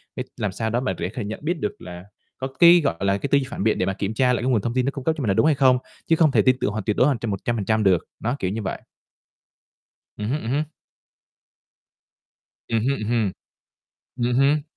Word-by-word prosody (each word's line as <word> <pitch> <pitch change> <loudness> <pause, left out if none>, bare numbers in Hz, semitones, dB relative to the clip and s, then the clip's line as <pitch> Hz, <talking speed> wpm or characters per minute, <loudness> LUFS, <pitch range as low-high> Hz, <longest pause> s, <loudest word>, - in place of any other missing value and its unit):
cái - - -4
làm 105 - -2
sao 110 +3 -3
đó 115 +2 0
mà 130 - -1
để - - -4
kh - - -8
nhận 105 +2 -5
biết 165 +1 -1
được 105 - -3
là 90 0 -9 0.3
có 130 - -3
cái, 170 0 +8
gọi 85 - +1
là, 100 +1 +1
cái 140 - -3
tư 140 - +6
duy 135 - 0
phản - - -4
biện 110 - +2
để - - 0
mà 95 - -1
kiểm 100 +2 -3
tra 125 +2 +2
lại 120 - -1
cái 130 - +1
nguồn 115 -5 +2
thông 115 +3 -2
tin 130 -1 +1
nó 140 - 0
cung 135 -2 -7
cấp 160 - +1
cho - - -3
mình 115 - -2
là - - +3
đúng 125 - +3
hay 155 -2 +4
không, 130 -2 +4 0.3
chứ 165 - +4
không 160 -3 +4
thể 110 -5 +4
tin 130 +3 +4
tưởng 105 - 0
hoàn 110 -1 -4
tuyệt 105 +2 -1
đối 125 - +5
hoàn 140 -5 +1
100% 110 +1 -1
được. 95 -4 +3 0.2
Đó, 120 +4 -1
kiểu 95 - -1
như 110 +3 -3
vậy. 95 - -4 1.4
Ừm 105 0 -3
hứm, 145 +4 -1
ừm 115 - -4
hứm. 145 +3 +1 2.0
Ừm 115 - +1
hưm 135 -4 0
hừm. 115 -5 +1 0.9
Ừm 120 0 0
hưm. 140 +3 +3
120 Hz, 250 wpm, -23 LUFS, 105-135 Hz, 2.0 s, cái